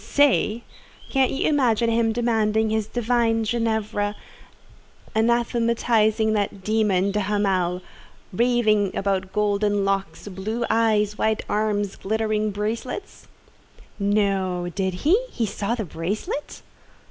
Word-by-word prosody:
"Say! 245 -5 +2 0.5
Can't 265 -2 +3
you 270 - -1
imagine 240 -6 +2
him 225 0 +2
demanding 220 -2 +1
his 220 -1 0
divine 230 -1 +1
Ginevra, 220 -2 -1 1.0
anathematizing 230 -1 +2
that 200 -2 -2
demon, 200 -2 +1
de 210 - 0
Hamal—raving 205 +2 0
about 190 -1 -1
golden 205 -1 +1
locks, 195 +1 -2
blue 210 +5 -3
eyes, 215 -2 +2
white 220 -1 0
arms, 205 -2 -1
glittering 215 +1 -1
bracelets?" 225 - -5 0.7
"No, 195 -3 0
did 190 -2 -1
he? 395 +11 +4
He 235 - -2
saw 210 +2 -2
the 220 -4 -4
bracelet?" 185 - -4
215 Hz, 105 wpm, -23 LUFS, 200-230 Hz, 1.0 s, he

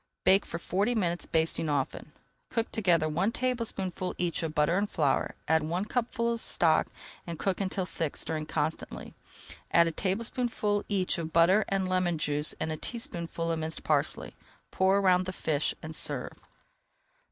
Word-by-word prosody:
Bake 195 +2 +4
for - - -4
forty 200 +8 0
minutes, 175 -5 -1
basting 160 -1 +1
often. 145 +1 -2 0.4
Cook 230 -1 -1
together 175 -7 +2
one 175 +8 +1
tablespoonful 230 -8 -2
each 175 -1 0
of 160 -2 -3
butter 150 +3 +3
and 205 +2 +1
flour, 145 -4 +1
add 160 0 +4
one 170 +6 -2
cupful 235 0 0
of 230 - -4
stock, - - +3 0.4
and 170 -1 -4
cook 195 +3 -1
until 190 -1 -1
thick, 165 -4 -3
stirring 155 -1 -2
constantly. 155 +1 -3 0.6
Add 170 0 +5
a - - 0
tablespoonful 210 - -1
each 190 -4 0
of 160 -1 -4
butter 175 +6 +5
and 195 -1 0
lemon 185 -2 +1
juice 150 0 +1
and 160 - -2
a 155 - -3
teaspoonful 170 -6 -4
of 165 - -1
minced 160 0 -3
parsley. - - +1 0.4
Pour 190 +1 +3
around 185 -2 +3
the - - -1
fish 155 -4 0
and 155 0 -4
serve. - - -1
180 Hz, 165 wpm, -29 LUFS, 160-200 Hz, 0.6 s, Add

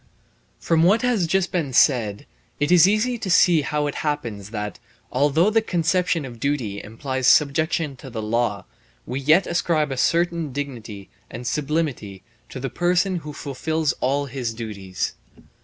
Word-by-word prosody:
From 165 -1 +2
what 200 +8 +4
has 230 -9 +1
just 190 +2 +1
been 155 -7 -2
said, 115 -3 +3 0.3
it 145 +3 +1
is 180 0 +7
easy 225 +4 +1
to 200 - -4
see 175 -2 +5
how 150 +1 -1
it 145 - -2
happens 115 -10 -3
that, 105 -2 -5 0.3
although 150 +9 +3
the 225 +1 +3
conception 180 -3 0
of 120 -3 -10
duty 120 -7 -2
implies 130 +4 -3
subjection 150 +1 +3
to 135 - -10
the 115 -2 -6
law, 110 -2 -1 0.4
we 130 +2 -4
yet 155 +7 +4
ascribe 160 -4 0
a 135 - -3
certain 170 +1 +1
dignity 120 -8 -6 0.2
and 120 +2 -8
sublimity 140 - -2 0.3
to 130 - -7
the 135 -1 -4
person 180 +2 +1
who 150 -2 -7
fulfils 150 +1 -2
all 140 +3 +1
his 125 -4 -4
duties. 100 -5 -4
145 Hz, 155 wpm, -23 LUFS, 120-170 Hz, 0.4 s, is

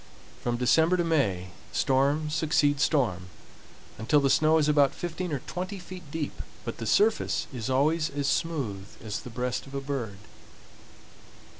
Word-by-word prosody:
From 120 -1 -1
December 160 +8 +4
to 175 - +2
May, 105 - +1 0.2
storm 140 +3 +1
succeeds 150 -2 +2
storm, 105 - +1 0.7
until 125 +7 +3
the 135 -1 +2
snow 155 +1 +4
is 150 -2 +2
about 145 -2 +4
fifteen 175 0 -4
or 140 -4 -3
twenty 185 +2 -4
feet 180 -3 -10
deep, 150 -1 -4 0.2
but 115 - -5
the 115 - -4
surface 215 - +2
is 120 -1 -4
always 155 +5 +2
as 140 0 -2
smooth 130 - -1 0.2
as 110 -2 -3
the - - -9
breast 125 +3 -3
of 135 - -9
a - - 0
bird. 135 -8 -4
145 Hz, 155 wpm, -28 LUFS, 125-160 Hz, 0.7 s, December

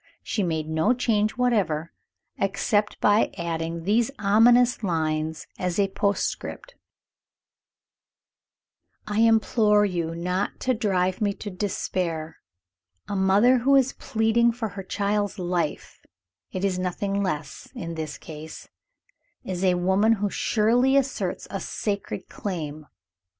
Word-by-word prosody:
She 210 - -2
made 160 -4 -1
no 160 +10 +2
change 215 -3 +1
whatever, 195 -11 0 0.5
except 205 +2 0
by 210 +2 +3
adding 165 0 -3
these 220 +6 +2
ominous 235 +5 +4
lines 160 -4 -1
as 180 -1 -1
a 200 -1 +2
postscript: 205 - -2 2.3
"I 210 0 -2
implore 220 -2 +4
you 170 -4 -2
not 180 +3 -2
to 255 - +1
drive 190 -5 0
me 205 -1 +1
to 205 - -7
despair. 175 -4 -3 0.7
A 205 - -3
mother 200 +7 +4
who 275 +4 +4
is 270 -1 +3
pleading 225 +1 +2
for 225 -2 -3
her 200 0 -7
child's 205 +2 -1
life 175 -4 -2 0.5
it 185 +1 -2
is 185 -2 0
nothing 195 +2 -1
less, 155 -6 -4
in 170 0 -5
this 155 -2 -5
case 155 0 -10 0.7
is 185 -1 -4
a 185 -1 +4
woman 190 +5 +3
who 205 -2 -1
surely 245 +5 +2
asserts 250 -9 -1
a 195 - -3
sacred 200 0 -4
claim. 155 -6 -5
200 Hz, 125 wpm, -25 LUFS, 170-220 Hz, 2.3 s, ominous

